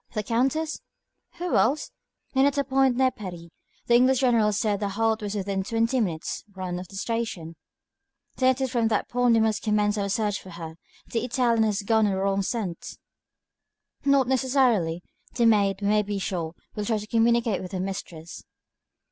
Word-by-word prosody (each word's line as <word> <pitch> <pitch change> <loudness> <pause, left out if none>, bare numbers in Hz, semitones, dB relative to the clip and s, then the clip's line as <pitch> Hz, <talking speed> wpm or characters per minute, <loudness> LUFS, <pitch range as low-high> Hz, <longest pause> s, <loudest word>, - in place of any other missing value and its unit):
"The 215 - -1
Countess?" 270 +9 0 0.5
"Who 350 0 -2
else?" 280 +6 +2 0.4
"And 265 +1 +4
at 285 0 -1
a 280 - +2
point 265 -2 +2
near 260 0 +3
Paris. 175 -6 -9 0.4
The 235 - +2
English 255 +2 +4
General 230 -5 +3
said 205 0 0
the 205 -1 -1
halt 220 +2 0
was 205 0 -4
within 195 -1 -2
twenty 230 +5 0
minutes' 170 -8 -2
run 180 -2 -4
of 180 - -8
the 195 - -13
station." 195 -6 -3 0.8
"Then 260 0 +4
it 260 +1 0
is 260 -2 -1
from 235 -3 +1
that 215 -2 0
point 245 -1 +3
we 225 - +4
must 220 -1 +1
commence 210 -1 +1
our 200 0 -1
search 210 0 -1
for 190 - -12
her. 165 -2 -8 0.4
The 230 -1 -1
Italian 240 -2 +1
has 210 -1 -1
gone 220 +1 +3
on 200 - 0
the - - -2
wrong 195 +1 +1
scent." 195 -4 -4 1.1
"Not 275 -2 +3
necessarily. 250 -10 +1 0.3
The 235 - +2
maid, 200 -3 +3
we - - +1
may 210 0 +4
be 205 0 -3
sure, 175 -4 -3 0.2
will 210 - -3
try 220 +1 +1
to 210 - -6
communicate 230 -1 +2
with 185 - -7
her 185 - -2
mistress." 175 -4 -6
215 Hz, 190 wpm, -25 LUFS, 195-245 Hz, 1.1 s, And